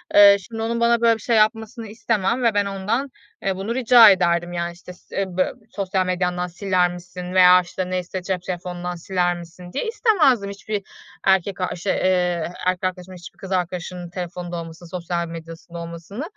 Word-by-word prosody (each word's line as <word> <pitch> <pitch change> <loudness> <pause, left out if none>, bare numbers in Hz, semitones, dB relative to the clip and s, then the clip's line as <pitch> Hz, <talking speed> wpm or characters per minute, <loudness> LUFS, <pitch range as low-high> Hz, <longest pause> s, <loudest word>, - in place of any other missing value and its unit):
eee, 200 -1 +9
şimdi 225 +4 -8
onun 235 +1 -1
bana 235 0 +3
böyle 230 -1 +5
bir 220 - -15
şey 235 0 +1
yapmasını 225 +1 +1
istemem 220 +2 -1
ve 230 -2 +3
ben 205 0 +2
ondan, 205 +8 -2 0.3
eee, 195 -1 0
bunu 200 +5 -3
rica 240 -3 +8
ederdim, 175 -2 +2
yani, 170 0 -2
işte, 180 +1 -12
s 180 - -15
eee, 195 - +1
bö 185 - +2 0.2
"Sosyal 190 -2 -1
medyandan 180 -1 -1
siler 180 0 +1
misin?" 180 +1 -8
veya, 180 0 +7
işte, 180 +1 -5
neyse 185 0 -3
"Cep 185 0 -2
telefonundan 180 -1 -4
siler 175 0 0
misin?" 175 +1 -11
diye - - -2
istemezdim 305 - +3
hiçbir 200 0 -4 0.4
erkek 190 0 +2
arşı 180 +1 -3
eee, 180 -3 +1 0.2
erkek 185 0 0
arkadaşımın 185 0 -4
hiçbir 175 - -12
kız 195 - -9
arkadaşımın 180 -1 -3
telefonunda 175 -1 -6
olmasını, 165 +1 -9
sosyal 170 -1 -3
medyasında 165 +1 -9
olmasını. 170 - -7
185 Hz, 175 wpm, -22 LUFS, 175-205 Hz, 0.4 s, eee